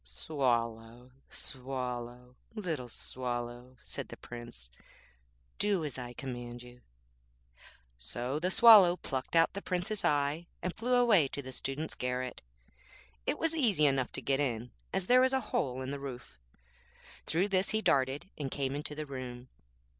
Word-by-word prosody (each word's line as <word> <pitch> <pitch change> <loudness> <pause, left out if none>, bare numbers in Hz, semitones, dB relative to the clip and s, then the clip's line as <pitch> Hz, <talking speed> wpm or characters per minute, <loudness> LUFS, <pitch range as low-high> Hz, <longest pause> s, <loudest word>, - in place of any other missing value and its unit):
'Swallow, 115 - -2 0.2
Swallow, 125 -2 -4 0.2
little 160 - -3
Swallow,' 120 +1 -5
said - - -5
the - - -9
Prince, 120 - -8 0.9
'do 200 -6 +2
as 135 -3 -4
I 120 -1 -6
command 120 -1 -6
you.' 125 0 -14 1.2
So 120 - -3
the 180 +3 0
Swallow 200 -5 +9
plucked 130 0 -3
out 165 0 +5
the 200 - -4
Prince's 195 +3 -1
eye, 145 +3 +1 0.2
and 180 0 -1
flew 245 +3 +1
away 225 - +5
to 140 +1 -5
the 130 - -7
student's 135 +4 -3
garret. 125 0 -3 0.9
It - - +1
was 325 0 +1
easy 220 - +3
enough 135 -3 +2
to - - -2
get 135 0 +1
in, 125 -4 -1 0.2
as 190 -1 0
there 250 +5 +6
was 260 +1 +4
a 265 - +3
hole 130 -1 0
in 130 - -4
the 140 - -4
roof. 130 - -8 0.9
Through 180 +6 +2
this 190 -1 +2
he 220 0 +1
darted, 135 +1 +2
and 140 -2 -2
came 135 0 -1
into 150 0 -4
the 155 0 -4
room. 130 -2 -7
135 Hz, 155 wpm, -32 LUFS, 125-170 Hz, 1.2 s, Swallow